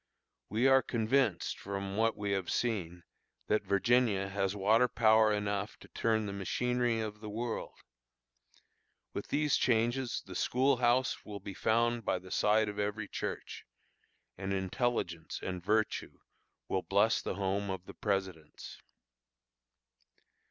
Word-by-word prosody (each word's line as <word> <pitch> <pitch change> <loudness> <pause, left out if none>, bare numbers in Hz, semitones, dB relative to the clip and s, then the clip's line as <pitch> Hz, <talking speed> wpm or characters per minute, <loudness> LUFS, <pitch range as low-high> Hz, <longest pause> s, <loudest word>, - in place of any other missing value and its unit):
We 115 +5 +1
are 135 0 +6
convinced, 115 -3 0
from 100 0 -4
what 115 +1 +1
we 105 -1 -2
have 95 -2 -1
seen, 90 -8 -2 0.4
that 105 - +2
Virginia 100 -1 +2
has 95 0 -1
water 110 +5 +4
power 110 -2 +4
enough 105 0 -2
to - - -15
turn 110 -1 0
the 100 - -4
machinery 120 +4 0
of 105 -1 -4
the 105 0 -7
world. 115 +2 -4 1.4
With - - -5
these 150 0 +2
changes 120 +2 +1
the 95 - -9
school 130 +8 +2
house 125 +2 +2
will 105 -1 -7
be 100 0 -7
found 115 +3 +1
by - - 0
the 90 0 -12
side 105 +1 +3
of 105 0 -5
every 105 +1 -2
church, - - -5 0.8
and 95 0 -3
intelligence 95 -4 -2
and 90 -2 -4
virtue 110 +2 0 0.5
will 95 - 0
bless 100 +5 +2
the - - -3
home 100 +1 -1
of 95 -1 -4
the - - -10
Presidents. 95 -7 -4
105 Hz, 140 wpm, -32 LUFS, 95-120 Hz, 1.4 s, are